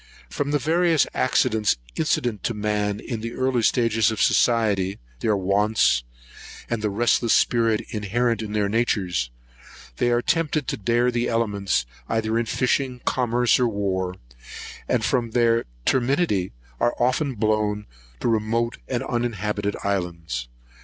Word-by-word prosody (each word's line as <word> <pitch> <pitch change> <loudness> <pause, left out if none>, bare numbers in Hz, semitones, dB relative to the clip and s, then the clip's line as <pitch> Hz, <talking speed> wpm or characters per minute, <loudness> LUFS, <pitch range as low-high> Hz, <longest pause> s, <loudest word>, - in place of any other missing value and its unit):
From 145 -1 -2
the 145 - +2
various 165 +2 +2
accidents 110 - +2 0.2
incident 125 -9 0
to 115 - -1
man 105 -1 -1
in 115 -4 -5
the 115 +1 -5
early 130 -2 0
stages 115 -2 +2
of 110 - -3
society, 105 -5 +2 0.2
their 105 -2 +1
wants, 100 - +2 0.7
and 115 -2 -1
the 105 - 0
restless 115 +2 +2
spirit 115 -2 +2
inherent 115 +2 0
in 105 -1 -5
their 105 -1 +1
natures, 100 - 0 0.7
they 120 - +2
are 120 0 +2
tempted 155 -4 0
to - - -1
dare 120 +4 +1
the 120 0 0
elements, 100 - 0 0.2
either 110 0 0
in 115 - -2
fishing, 125 +3 0
commerce, 125 -1 +2
or 125 - +3
war; 95 -4 -2 0.7
and 115 -3 +1
from 120 -4 +1
their 115 0 +2 0.2
temerity 130 - +1 0.3
are 120 - +1
often 130 +2 +1
blown 105 -1 0 0.4
to - - 0
remote 115 +1 0
and 125 -2 -2
uninhabited 105 -4 -2
islands. 85 -10 -2
115 Hz, 140 wpm, -23 LUFS, 105-120 Hz, 0.7 s, or